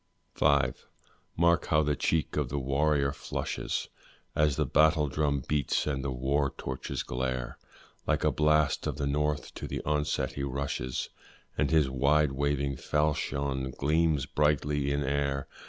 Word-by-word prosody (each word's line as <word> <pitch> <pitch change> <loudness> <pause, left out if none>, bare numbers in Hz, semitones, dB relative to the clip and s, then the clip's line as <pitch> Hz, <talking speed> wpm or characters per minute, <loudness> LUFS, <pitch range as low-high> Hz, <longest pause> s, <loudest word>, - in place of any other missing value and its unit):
V. - - +3 0.9
Mark 85 -1 +3
how 75 0 +3
the 75 0 +1
cheek 80 +2 0
of 75 -4 0
the 70 - -2
warrior 70 +1 +1
flushes, - - -3 0.5
As 75 -2 +3
the - - +1
battle 75 -1 +4
drum 70 -1 0
beats 75 -3 0
and 70 -3 -2
the 70 - -2
war 70 +2 0
torches 65 0 -4
glare; 65 0 -3 0.5
Like - - +1
a - - +3
blast 75 0 +2
of - - -3
the 70 - -1
north 75 +1 -1
to - - -6
the - - -3
onset 75 0 0
he 70 - -5
rushes, 70 -1 -3 0.5
And - - +1
his 80 -3 +4
wide 70 +3 +2
waving 70 0 -1
falchion 70 -3 -1
gleams 75 -1 +2
brightly 75 0 +1
in 70 0 0
air. 70 0 -1
70 Hz, 150 wpm, -29 LUFS, 70-75 Hz, 0.9 s, battle